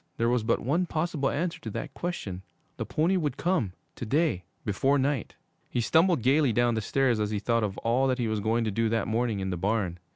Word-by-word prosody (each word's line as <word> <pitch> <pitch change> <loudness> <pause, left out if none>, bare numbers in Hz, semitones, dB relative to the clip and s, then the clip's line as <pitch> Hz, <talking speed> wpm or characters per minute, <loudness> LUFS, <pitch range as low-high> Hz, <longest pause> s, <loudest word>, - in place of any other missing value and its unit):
There 115 0 +2
was 120 -1 +2
but 115 +2 +1
one 165 +9 +1
possible 155 -4 -1
answer 170 +2 -2
to - - -5
that - - -5
question. 105 - -4 0.4
The - - -4
pony 170 +5 +2
would 150 -6 -1
come 145 - 0 0.2
to - - -5
day 140 - +1 0.2
before 135 +7 +2
night. 140 -3 -1 0.3
He - - -1
stumbled 160 - +3
gayly 135 +1 +4
down 120 +2 +2
the 110 - -1
stairs 125 +1 +1
as 105 -1 0
he 105 - -1
thought 115 +2 +1
of 100 -2 -2
all 125 +4 +1
that 130 -1 +1
he 120 -3 -1
was 110 -1 -1
going 110 +3 +1
to 110 - -1
do 115 +2 +1
that 115 -1 0
morning 115 -1 0
in 95 0 -2
the 90 - -2
barn. 95 -2 -1
120 Hz, 230 wpm, -28 LUFS, 110-145 Hz, 0.4 s, gayly